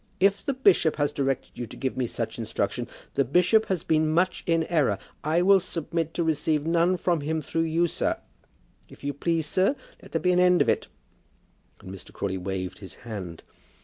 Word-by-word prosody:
"If 195 Hz, +1 st, +3 dB
the 275 Hz, -, -1 dB
bishop 195 Hz, -10 st, +4 dB
has 145 Hz, -1 st, 0 dB
directed 135 Hz, -2 st, -2 dB
you 120 Hz, -, -4 dB
to -, -, -11 dB
give 130 Hz, -1 st, -2 dB
me 125 Hz, -2 st, -1 dB
such -, -, -4 dB
instruction, -, -, -2 dB, 0.3 s
the 140 Hz, -, +2 dB
bishop 180 Hz, -, +3 dB
has 185 Hz, -4 st, -1 dB
been 155 Hz, 0 st, +2 dB
much 175 Hz, +4 st, +1 dB
in 165 Hz, -1 st, +3 dB
error. 150 Hz, -, +1 dB, 0.3 s
I 160 Hz, +4 st, +2 dB
will 195 Hz, +1 st, +6 dB
submit 165 Hz, -2 st, -3 dB
to 170 Hz, -, +1 dB
receive 155 Hz, -1 st, 0 dB
none 170 Hz, +2 st, +2 dB
from 175 Hz, -3 st, 0 dB
him 160 Hz, +2 st, -1 dB
through 165 Hz, +2 st, -1 dB
you, 165 Hz, +2 st, +2 dB
sir. 170 Hz, -, -1 dB, 0.7 s
If -, -, -16 dB
you 145 Hz, 0 st, -2 dB
please, 165 Hz, +2 st, 0 dB
sir, 190 Hz, -, +2 dB, 0.3 s
let -, -, -14 dB
there -, -, 0 dB
be 180 Hz, -, +2 dB
an 180 Hz, -, +3 dB
end 180 Hz, -1 st, +5 dB
of -, -, +3 dB
it;" -, -, +1 dB, 0.9 s
and 95 Hz, -, -9 dB
Mr. 95 Hz, -, -11 dB
Crawley 95 Hz, -1 st, -3 dB
waved 95 Hz, 0 st, -4 dB
his 95 Hz, -3 st, -10 dB
hand. 95 Hz, -8 st, -7 dB
160 Hz, 200 wpm, -26 LUFS, 135-180 Hz, 0.9 s, will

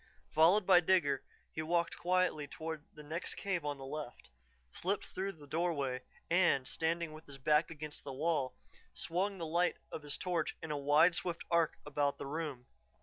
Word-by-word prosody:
Followed 175 Hz, +6 st, +6 dB
by 185 Hz, -2 st, +8 dB
Digger, 160 Hz, -7 st, +3 dB, 0.3 s
he 155 Hz, -, -2 dB
walked 170 Hz, +1 st, +1 dB
quietly 180 Hz, -4 st, +1 dB
toward 160 Hz, 0 st, -5 dB
the 150 Hz, -, -12 dB
next 160 Hz, +4 st, -4 dB
cave 190 Hz, -5 st, -1 dB
on 145 Hz, -1 st, -2 dB
the 135 Hz, -, -8 dB
left, 140 Hz, -, -7 dB, 0.4 s
slipped 195 Hz, -, -1 dB
through 195 Hz, +1 st, -3 dB
the 150 Hz, -4 st, -14 dB
doorway, 145 Hz, -4 st, -1 dB, 0.3 s
and, 170 Hz, -7 st, +3 dB
standing 165 Hz, 0 st, -1 dB
with 155 Hz, +1 st, -12 dB
his 140 Hz, -1 st, -9 dB
back 150 Hz, +4 st, +3 dB
against 155 Hz, -2 st, -7 dB
the 140 Hz, -, -5 dB
wall, 140 Hz, -1 st, 0 dB, 0.4 s
swung 190 Hz, +4 st, -1 dB
the 170 Hz, -, -3 dB
light 175 Hz, +3 st, +2 dB
of -, -, -5 dB
his 145 Hz, -1 st, -3 dB
torch 175 Hz, -4 st, -1 dB
in 160 Hz, -, -5 dB
a -, -, 0 dB
wide, 145 Hz, +5 st, +5 dB
swift 170 Hz, 0 st, -2 dB
arc 170 Hz, -2 st, +3 dB
about 145 Hz, -1 st, 0 dB
the -, -, -6 dB
room. 145 Hz, -4 st, -4 dB
160 Hz, 180 wpm, -35 LUFS, 145-175 Hz, 0.4 s, by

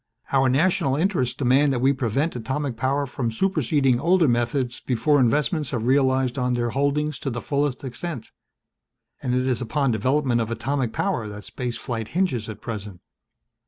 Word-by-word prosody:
Our 135 Hz, -1 st, +4 dB
national 145 Hz, 0 st, +2 dB
interests 155 Hz, -, 0 dB
demand 135 Hz, +2 st, +3 dB
that 125 Hz, -, 0 dB
we 135 Hz, +3 st, +3 dB
prevent 135 Hz, +5 st, -1 dB
atomic 130 Hz, +3 st, -3 dB
power 135 Hz, +4 st, 0 dB
from 125 Hz, -2 st, -3 dB
superseding 140 Hz, -4 st, +1 dB
older 170 Hz, +2 st, +3 dB
methods 120 Hz, +1 st, 0 dB
before 135 Hz, +4 st, +2 dB
investments 150 Hz, -, +1 dB
have 120 Hz, -4 st, -2 dB
realized 130 Hz, 0 st, +2 dB
on 125 Hz, -1 st, +1 dB
their 120 Hz, -1 st, -1 dB
holdings 140 Hz, +1 st, 0 dB
to 135 Hz, -, -3 dB
the 120 Hz, -1 st, -3 dB
fullest 140 Hz, 0 st, -1 dB
extent. 130 Hz, 0 st, -6 dB, 0.9 s
And 125 Hz, 0 st, 0 dB
it 130 Hz, 0 st, +1 dB
is 130 Hz, -2 st, 0 dB
upon 135 Hz, +3 st, 0 dB
development 125 Hz, +2 st, +1 dB
of 115 Hz, -, -2 dB
atomic 120 Hz, +2 st, -1 dB
power 110 Hz, -1 st, -1 dB
that 105 Hz, 0 st, -8 dB
space 125 Hz, -2 st, -4 dB
flight 115 Hz, -3 st, -4 dB
hinges 130 Hz, -, 0 dB
at 110 Hz, -1 st, -8 dB
present." 105 Hz, -5 st, -6 dB
130 Hz, 165 wpm, -24 LUFS, 120-145 Hz, 0.9 s, Our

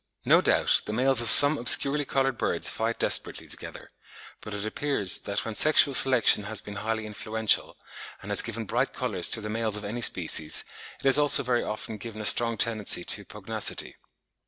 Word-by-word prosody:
No -, -, +4 dB
doubt -, -, +1 dB
the 105 Hz, -, -5 dB
males 130 Hz, +1 st, +1 dB
of 120 Hz, -, 0 dB
some 145 Hz, +1 st, +5 dB
obscurely 140 Hz, +4 st, +3 dB
coloured 135 Hz, -1 st, -2 dB
birds -, -, -1 dB
fight 115 Hz, +1 st, -4 dB
desperately -, -, +1 dB
together, -, -, -9 dB, 0.5 s
but 105 Hz, -, -10 dB
it 105 Hz, 0 st, -5 dB
appears 110 Hz, -4 st, -2 dB
that 100 Hz, +2 st, -4 dB
when 115 Hz, -, -6 dB
sexual 145 Hz, +3 st, +4 dB
selection 125 Hz, -6 st, +4 dB
has 110 Hz, -1 st, -5 dB
been 105 Hz, -1 st, -10 dB
highly 110 Hz, +1 st, -4 dB
influential, 110 Hz, +1 st, -2 dB, 0.5 s
and -, -, -8 dB
has -, -, +5 dB
given 115 Hz, +1 st, -6 dB
bright 125 Hz, +6 st, -3 dB
colours 105 Hz, -9 st, -2 dB
to 110 Hz, -, +1 dB
the 105 Hz, -, -7 dB
males 110 Hz, -1 st, -3 dB
of 105 Hz, -, -8 dB
any 115 Hz, +4 st, -6 dB
species, 80 Hz, -7 st, +1 dB, 0.3 s
it -, -, -13 dB
has 135 Hz, +1 st, +4 dB
also 145 Hz, -1 st, +5 dB
very 125 Hz, -1 st, -1 dB
often 110 Hz, +1 st, -7 dB
given 115 Hz, -1 st, -9 dB
a 110 Hz, -, -5 dB
strong 115 Hz, +1 st, +3 dB
tendency 110 Hz, -6 st, -1 dB
to -, -, -2 dB
pugnacity. -, -, -5 dB
115 Hz, 185 wpm, -25 LUFS, 105-130 Hz, 0.5 s, some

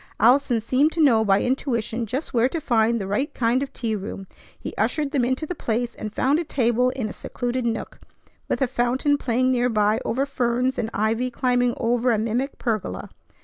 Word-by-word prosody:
Allison 255 Hz, -2 st, +4 dB
seemed 265 Hz, +7 st, +2 dB
to 335 Hz, -, -5 dB
know 240 Hz, -8 st, +5 dB
by 195 Hz, -2 st, +3 dB
intuition 240 Hz, -3 st, -1 dB
just 265 Hz, +9 st, -4 dB
where 240 Hz, +1 st, +3 dB
to 330 Hz, -, -3 dB
find 235 Hz, -4 st, +2 dB
the 195 Hz, -, -3 dB
right 205 Hz, +9 st, -1 dB
kind 240 Hz, +2 st, +1 dB
of 275 Hz, -, -4 dB
tea 225 Hz, -3 st, -2 dB
room. 195 Hz, -1 st, -6 dB, 0.3 s
He -, -, -6 dB
ushered 300 Hz, -3 st, 0 dB
them 275 Hz, -5 st, +1 dB
into 260 Hz, +5 st, 0 dB
the 360 Hz, -, -4 dB
place, 240 Hz, -5 st, -2 dB
and 215 Hz, -, -6 dB
found 275 Hz, +8 st, +1 dB
a -, -, -1 dB
table 250 Hz, -4 st, +1 dB
in 255 Hz, -3 st, -3 dB
a -, -, -7 dB
secluded 245 Hz, 0 st, -3 dB
nook, 225 Hz, -, -4 dB, 0.5 s
with -, -, +1 dB
a -, -, +2 dB
fountain 255 Hz, +4 st, +1 dB
playing 255 Hz, 0 st, +1 dB
nearby 225 Hz, -4 st, +2 dB
over 265 Hz, +4 st, 0 dB
ferns, 250 Hz, 0 st, 0 dB
and 225 Hz, -, -1 dB
ivy 225 Hz, +4 st, 0 dB
climbing 245 Hz, 0 st, +1 dB
over 245 Hz, +1 st, +1 dB
a 225 Hz, -, +2 dB
mimic 230 Hz, +6 st, -2 dB
pergola. 215 Hz, -, -3 dB
245 Hz, 195 wpm, -23 LUFS, 225-260 Hz, 0.5 s, know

